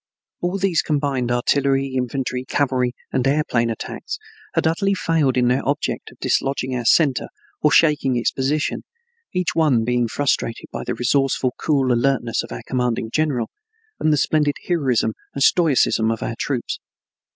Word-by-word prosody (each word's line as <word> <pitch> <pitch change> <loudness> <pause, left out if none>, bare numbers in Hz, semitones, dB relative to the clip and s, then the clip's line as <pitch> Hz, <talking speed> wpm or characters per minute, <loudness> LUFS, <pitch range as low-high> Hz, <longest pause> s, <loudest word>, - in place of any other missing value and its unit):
All 180 +2 -1
these 190 -4 +2
combined 140 -4 -1
artillery, 135 +2 +1
infantry, 130 0 -2
cavalry, 130 -2 0 0.2
and 130 - +1
aeroplane 135 -5 +1
attacks 115 - -5 0.4
had - - +1
utterly 195 +5 +1
failed 155 -8 +1
in 125 -1 +3
their 125 +2 +2
object 140 +1 -2
of - - -19
dislodging 130 -1 0
our 120 -1 -3
center 140 +2 +3 0.3
or 150 - +4
shaking 150 -6 +4
its 120 - +1
position, 145 +3 -1 0.5
each 180 -2 -1
one 145 -8 +3
being 120 0 +1
frustrated 120 -2 -1
by - - -4
the - - -3
resourceful, 130 0 +1
cool 135 -5 +2
alertness 120 -1 +1
of - - -10
our - - -6
commanding 120 -3 -1
general 140 -7 0 0.5
and 155 - +2
the 150 - +3
splendid 150 0 +2
heroism 130 -10 +1 0.2
and 140 - +1
stoicism 140 -10 +3
of 115 -1 -2
our - - -2
troops. 125 +1 -3
135 Hz, 155 wpm, -21 LUFS, 125-150 Hz, 0.5 s, or